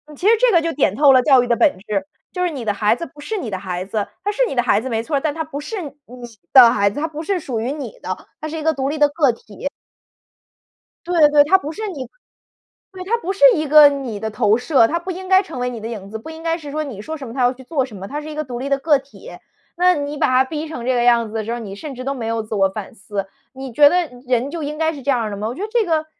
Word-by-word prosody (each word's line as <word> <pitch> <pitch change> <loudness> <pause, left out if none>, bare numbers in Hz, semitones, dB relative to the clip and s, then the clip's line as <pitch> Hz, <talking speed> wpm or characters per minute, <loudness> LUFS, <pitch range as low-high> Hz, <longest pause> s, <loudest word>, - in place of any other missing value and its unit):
其 360 - -2
实 450 - +7
这 - - +4
个 340 -4 +4
就 330 0 -1
点 210 -8 +1
透 285 -1 +6
了 255 - +6
教 270 -4 +6
育 245 - -2
的 235 - +2
本 295 - +3
质， 205 +2 -3 0.3
就 360 -1 -2
是 355 - +1
你 270 -6 -6
的 210 -2 0
孩 210 +2 +2
子 335 - -6
不 295 - -19
是 430 +9 -4
你 240 - -4
的 190 - -3
孩 180 -1 -4
子， 210 0 -3 0.2
他 410 - 0
是 420 - -3
你 - - -4
的 245 - +2
孩 205 - +2
子 255 - -6
没 225 -2 -1
错 285 +6 -3
儿， - - +1
但 295 0 -1
他 320 0 -3
不 290 -2 -7
是 380 +6 -5
你 295 - -6 0.6
的 250 -4 +10
孩 200 0 +2
子， 205 - -6
他 320 - -1
不 310 +1 -7
是 380 +2 -1
属 250 -8 -4
于 245 +4 -2
你 300 - -7
的， - - -3 0.2
他 310 - -5
是 320 +1 -5
一 - - -4
个 320 0 +2
独 270 0 -2
立 305 - -3
的 295 -1 +5
个 290 -4 +2
体。 220 +2 -8 1.4
对 335 -4 +4
对， 295 -1 +6
他 335 +6 +3
不 300 -1 -6
是 430 +4 -5
你 280 -8 -7 0.8
对， 370 -1 -8
他 445 +5 +1
不 380 - -3
是 390 - -14
一 310 -2 -1
个 300 0 +9
你 265 -7 -5
的 220 0 -4
投 215 0 +2
射， 250 -3 +3
他 335 - -1
不 370 +2 -5
应 370 +1 -7
该 380 +1 +5
成 320 -9 -8
为 250 0 -1
你 240 - -6
的 225 - -5
影 200 -4 -7
子， 220 - -5
不 315 - -10
应 320 - -10
该 330 0 0
是 295 -3 -9
说， 310 +1 -2
你 240 -9 -7
说 315 +8 -6
什 270 -3 -8
么 230 - -8
他 260 - -1
要 245 +1 +3
去 260 0 -14
做 265 0 -1
什 225 -6 -12
么， 195 +1 -7
他 295 +2 -5
是 310 - -8
一 - - -8
个 305 - -2
独 245 -3 -6
立 270 - -4
的 275 - +1
个 295 0 +3
体。 275 +1 -14 0.5
那 360 +1 +4
你 290 0 -4
把 - - +2
他 255 +1 +4
逼 310 +3 -5
成 250 -7 -7
这 255 -1 +1
个 240 - +2
样 235 -1 +4
子 215 - -12
的 220 -1 -2
时 230 - -4
候 240 - -2
儿， - - -6
你 195 -3 -7
甚 280 +6 -7
至 255 - -7
都 275 - -1
没 230 -4 -5
有 225 0 -1
自 215 - -5
我 195 -1 +3
反 210 +2 -8
思， 200 -1 -5 0.3
你 265 -1 -8
觉 290 +2 +7
得 355 0 +1 0.2
人 250 +2 +1
就 330 -1 -5
应 295 +1 -4
该 320 0 0
是 280 - -9
这 280 - +1
样 245 -3 +1
儿 220 - -2
的 200 - -5
吗？ 215 +2 -3
我 235 - -4
觉 375 - -8
得 - - -2
这 465 -3 +2
个 315 -2 0
275 Hz, 345 characters per minute, -20 LUFS, 230-320 Hz, 1.4 s, 的